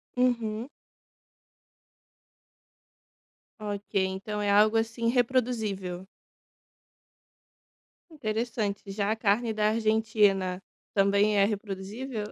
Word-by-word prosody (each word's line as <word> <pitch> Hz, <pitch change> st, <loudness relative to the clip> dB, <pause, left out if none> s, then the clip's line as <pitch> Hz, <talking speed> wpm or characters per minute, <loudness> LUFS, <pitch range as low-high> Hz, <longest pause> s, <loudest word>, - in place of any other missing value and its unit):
Uhum. 235 Hz, -1 st, 0 dB, 2.9 s
Ok, 205 Hz, -1 st, -6 dB
então 195 Hz, +3 st, -4 dB
é 205 Hz, -, 0 dB
algo, 215 Hz, +2 st, +5 dB
assim, 230 Hz, +1 st, -1 dB
reproduzível. 220 Hz, -7 st, 0 dB, 2.0 s
Interessante. 220 Hz, -6 st, -2 dB
Já 200 Hz, +1 st, -1 dB
a -, -, +1 dB
carne 225 Hz, +1 st, +1 dB
da 215 Hz, 0 st, +2 dB
Argentina 215 Hz, -4 st, +2 dB, 0.3 s
também 200 Hz, +1 st, +3 dB
é 200 Hz, -, +5 dB
reproduzível? 210 Hz, +3 st, -4 dB
215 Hz, 80 wpm, -28 LUFS, 200-230 Hz, 2.9 s, algo